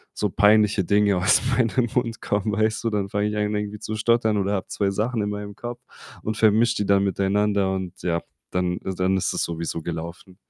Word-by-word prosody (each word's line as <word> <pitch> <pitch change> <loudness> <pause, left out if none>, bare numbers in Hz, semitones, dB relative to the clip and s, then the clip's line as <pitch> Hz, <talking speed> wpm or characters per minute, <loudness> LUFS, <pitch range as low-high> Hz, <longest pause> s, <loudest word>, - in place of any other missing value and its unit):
so 105 - 0
peinliche 105 -1 +4
Dinge 100 -1 +3
aus 95 - +4
meinem 120 0 +1
Mund 115 -3 0
kommen, 105 +1 -1
weißt 110 +2 0
du? 115 - +1
Dann 100 -2 -2
fange 105 +1 0
ich 105 0 -3
an 105 0 0
irgendwie 105 0 -3
zu 110 0 -5
stottern 110 -1 +2
oder 100 +1 0
habe 95 - -2
2 100 -1 0
Sachen 110 +3 -1
in 105 - -1
meinem 105 -1 -6
Kopf 120 +1 -7 0.4
und 110 0 -2
vermische 115 +2 +3
die 105 - -1
dann 100 0 +4
miteinander 100 0 +1
und, 95 -2 -6
ja, 85 -1 -1 0.3
dann 90 -1 0
is 95 - -5
dann 95 +1 +1
ist - - -1
es - - -1
sowieso 85 0 -3
gelaufen. 85 +2 -7
105 Hz, 210 wpm, -24 LUFS, 95-110 Hz, 0.4 s, peinliche